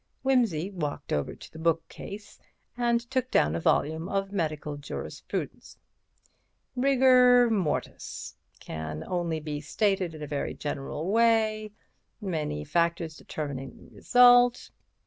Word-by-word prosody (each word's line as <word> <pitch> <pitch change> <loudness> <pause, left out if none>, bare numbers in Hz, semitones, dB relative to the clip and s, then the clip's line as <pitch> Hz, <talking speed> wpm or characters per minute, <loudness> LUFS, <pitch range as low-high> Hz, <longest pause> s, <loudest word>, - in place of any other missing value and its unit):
Wimsey 225 - +1
walked 150 -6 -4
over 75 -1 -1
to - - -13
the 160 - -10
bookshelf 165 +5 -3 0.4
and 235 -1 +2
took 260 -1 0
down 75 - +3
a - - -1
volume 160 - +1
of 195 0 -1
Medical 155 -5 -2
Jurisprudence. 145 0 -6 1.0
"'Rigor 250 -2 +5
mortis—can 80 - -4
only 170 -3 -2
be 150 -1 -5
stated 190 0 0
in 155 - -8
a - - -3
very 145 -1 -3
general 145 +4 -4
way—many 215 - -1
factors 170 - 0
determine 140 -4 -6
the - - -17
result.' 245 -1 +5
175 Hz, 110 wpm, -28 LUFS, 150-230 Hz, 1.0 s, Rigor